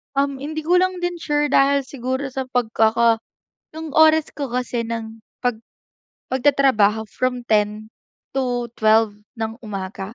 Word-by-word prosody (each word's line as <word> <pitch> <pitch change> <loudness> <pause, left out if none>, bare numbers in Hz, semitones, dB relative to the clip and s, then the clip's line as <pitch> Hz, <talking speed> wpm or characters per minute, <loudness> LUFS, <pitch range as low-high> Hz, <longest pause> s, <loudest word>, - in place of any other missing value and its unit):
Um, 280 0 +1
hindi 310 +2 -4
ko 330 +3 +1
lang 370 0 +2
din 350 0 -2
sure 295 -3 0
dahil 275 -1 +3
siguro 260 +1 -3
sa 265 0 -4
pagkaka 230 -2 +2 0.5
yung 320 0 -6
oras 315 +1 +4
ko 285 - -4
kasi 245 -1 -2
ng 225 -1 -5 0.2
pag 245 -3 0 0.7
pagtatrabaho 255 -6 +3
from 255 -1 -1
10:00 215 0 0 0.4
to 245 -3 -1
12:00 220 -1 +4 0.2
ng 225 +1 -3
umaga. 195 0 -6
250 Hz, 135 wpm, -21 LUFS, 225-280 Hz, 0.7 s, oras